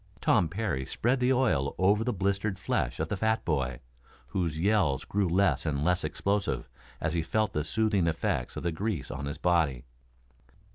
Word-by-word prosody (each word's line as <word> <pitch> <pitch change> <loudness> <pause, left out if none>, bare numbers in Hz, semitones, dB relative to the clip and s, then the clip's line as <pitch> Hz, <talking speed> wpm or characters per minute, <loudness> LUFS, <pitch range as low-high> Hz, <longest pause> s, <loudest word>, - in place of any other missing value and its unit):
Tom 80 - +3
Parry 95 -7 -2
spread 125 - 0
the 125 +1 +3
oil 115 - +2
over 100 +4 +3
the 125 - 0
blistered 100 0 -1
flesh 95 - -1
of - - 0
the 100 - -1
fat 110 +3 0
boy, 65 -6 -1 0.5
whose 85 -6 -1
yells 95 -8 +2
grew 100 -1 0
less 95 +3 +2
and 75 -3 -1
less 90 0 +2
explosive 100 -10 -1 0.3
as - - -1
he 85 - +1
felt 110 +5 0
the 75 - 0
soothing 105 -1 +1
effects 80 -5 -1
of - - -4
the 85 - 0
grease 80 - -3
on 70 +1 -4
his 75 +2 -4
body. 80 -8 +1
90 Hz, 180 wpm, -29 LUFS, 75-105 Hz, 0.5 s, Tom